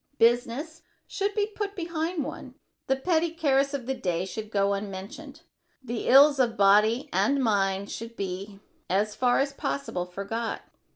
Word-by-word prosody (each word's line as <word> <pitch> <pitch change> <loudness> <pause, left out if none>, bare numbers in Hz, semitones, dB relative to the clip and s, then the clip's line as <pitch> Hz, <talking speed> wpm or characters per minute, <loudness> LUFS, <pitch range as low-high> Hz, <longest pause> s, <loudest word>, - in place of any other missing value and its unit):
Business 245 +7 +1 0.2
should 405 0 -2
be 415 -1 +2
put 410 -1 -5
behind 335 -2 -2
one. - - -8 0.3
The 265 - +3
petty 330 +4 +1
cares 280 -4 +1
of 260 -4 -5
the 265 - -1
day 180 -7 -2
should 215 +3 -6
go 200 -1 +1
unmentioned. 200 +10 -7 0.4
The 240 -2 -4
ills 280 +2 +7
of 235 -3 +1
body 210 +7 +4
and 280 0 +2
mind 200 -3 +1
should 230 +1 -7
be, 195 +1 -5 0.3
as 205 +3 +1
far 245 +1 +2
as 275 +1 0
possible, 275 -11 -3
forgot. 200 +5 -4
240 Hz, 155 wpm, -27 LUFS, 200-290 Hz, 0.4 s, ills